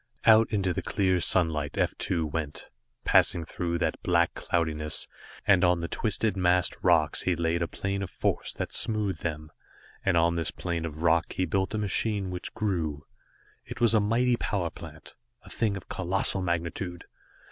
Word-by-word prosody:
Out 110 0 +6
into 95 -4 0
the - - -3
clear 95 -3 +1
sunlight 80 -5 +2
F - - +1
2 85 -3 -1
went, 75 -1 -4 0.4
passing 85 - +4
through 85 +1 -3
that - - -2
black 85 -1 +2
cloudiness, 80 -2 -1 0.4
and 95 -3 +4
on 90 -1 +3
the 85 - -3
twisted, 110 +2 -1
massed 90 -1 +2
rocks 80 -4 +3
he 90 - +1
laid 85 +1 0
a 85 - 0
plane 100 +1 -3
of 95 - -4
force - - -1
that - - -4
smoothed 105 -6 -1
them, 75 -2 -4 0.5
and 95 -3 +2
on 85 +1 +2
this 85 - +1
plane 85 -2 -3
of 80 0 -6
rock 85 0 +2
he 95 - 0
built 95 +5 -1
a - - 0
machine 105 -2 -1
which 90 0 -6
grew. 80 -9 -2 0.6
It - - -9
was 115 -1 +3
a 110 - +5
mighty 120 +4 +2
power 90 -8 -2
plant, 80 -1 -12 0.3
a - - -14
thing 105 -4 0
of 95 - -11
colossal 95 +1 +2
magnitude. 85 0 -3
90 Hz, 175 wpm, -27 LUFS, 85-100 Hz, 0.6 s, Out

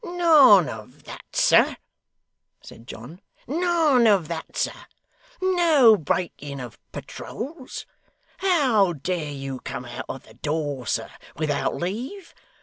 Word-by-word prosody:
'None 310 - +6
of 110 +3 -10
that, - - -10
sir,' - - +4 0.8
said 115 - -15
John, 135 - -10 0.2
'none 315 -5 +2
of 195 -7 +3
that, 165 -1 -6
sir. - - 0 0.7
No 335 -11 +5
breaking 150 -5 -3
of 125 -3 -9
patroles. 265 +3 -8 0.5
How 260 - +3
dare 160 +1 -3
you 135 -2 -6
come 125 - -6
out 120 +1 -7
of 135 - -6
the 110 - -17
door, 145 -1 -3
sir, - - -2 0.2
without 150 -2 -1
leave? 245 - -5
185 Hz, 120 wpm, -24 LUFS, -, 0.8 s, None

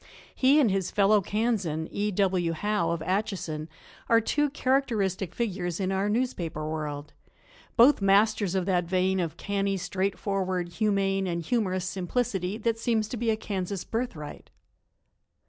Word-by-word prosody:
He 275 +3 +4
and 245 -9 +4
his 190 -2 0
fellow 205 +1 +4
Kansan, 195 -7 -1
E. 205 +1 -1
W. 185 -4 +1
Howe 205 0 0
of 165 -1 -2
Atchison, 180 -5 -2 0.4
are 230 - +6
two 295 +6 +1
characteristic 220 - 0
figures 185 -6 -2
in 190 -1 0
our 195 +2 0
newspaper 180 -10 -2
world, 150 -1 -4 0.6
both 250 +1 +6
masters 200 -1 +3
of 185 -2 0
that 180 -2 +1
vein 185 +2 +1
of 170 -2 -2
canny, 200 -1 -1
straightforward, 185 -1 -2
humane 195 -1 0
and 170 -1 -2
humorous 185 -2 0
simplicity 190 +1 -2
that 225 0 -1
seems 225 -2 +1
to 250 - -4
be 230 0 -1
a 220 - +2
Kansas 195 -3 -3
birthright. 225 -11 -5
195 Hz, 145 wpm, -27 LUFS, 180-215 Hz, 0.6 s, are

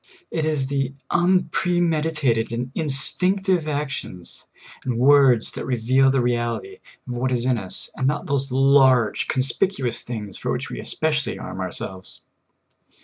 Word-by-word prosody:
It 160 -2 -1
is 150 -4 +1
the 135 0 -2 0.2
unpremeditated 165 -8 +1
and 120 +2 -4
instinctive 180 +4 +1
ac 150 -1 -2
tions 90 -9 -7 0.4
and 125 -3 -2
words 130 -3 +5
that - - -6
reveal 130 +2 +3
the 135 -1 +2
reality 120 - -2 0.3
of 125 - -4
what 125 +2 -1
is 120 -1 0
in 125 -3 +1
us, 95 -3 -4
and 130 - 0
not 145 +4 -1
those 140 -4 -1
large, 130 -3 +4
conspicuous 130 +1 0
things 105 -5 -7
for - - -2
which - - -3
we - - -5
especialbr 150 -2 -1
arm 95 - -7
ourselves. 95 +1 -2
135 Hz, 145 wpm, -22 LUFS, 120-155 Hz, 0.4 s, words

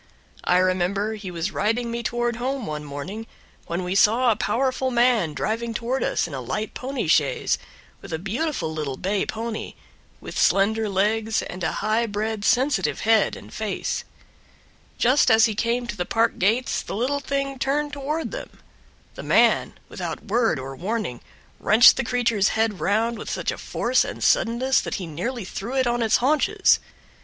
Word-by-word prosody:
I 180 - +4
remember 185 +3 +1
he 210 -3 -7
was 175 +3 -3
riding 230 +4 -1
me 235 0 -3
toward 240 0 -1
home 255 0 -2
one 150 -1 -4
morning 175 +11 -6 0.4
when 170 +2 -2
we 180 +1 -2
saw 230 +5 +4
a - - +2
powerful 260 +4 0
man 235 -10 +2
driving 230 +4 -2
toward 245 +4 -1
us - - 0
in 160 - -10
a 135 - -4
light 210 - -4
pony 265 +1 -3
chaise, - - +2 0.4
with - - -10
a 160 - -1
beautiful 195 - -2
little 145 -4 -4
bay 195 +1 -1
pony, 225 0 -5 0.4
with - - -6
slender 215 +2 +3
legs 215 +3 +1
and 180 0 -7
a - - +1
high 225 +2 +2
bred 215 0 -3
sensitive 240 - +1
head 220 -2 +3
and - - -12
face. 215 -2 -3 0.9
Just 255 +3 +4
as 220 -1 +6
he 220 - 0
came 235 +3 -1
to 235 - -5
the 180 - -2
park 225 +5 0
gates 225 +7 +1
the - - -6
little 260 +6 0
thing 275 -1 -3
turned 290 +2 -1
toward 295 +3 -3
them; - - -8 0.6
the - - -8
man, - - +3
without - - -6
word 225 -5 +1
or 135 +1 -6
warning, 185 - -3 0.4
wrenched 230 +3 +7
the - - -1
creature's 235 -4 +1
head 220 -3 +1
round 225 +3 0
with - - -6
such - - -2
a - - -6
force - - +1
and - - -6
suddenness 255 +3 +3
that - - -4
he 190 - -4
nearly 190 - -4
threw 225 +7 -5
it 260 -1 +2
on 240 0 0
its 225 -2 +3
haunches. 285 +4 +3
225 Hz, 175 wpm, -24 LUFS, 195-245 Hz, 0.9 s, wrenched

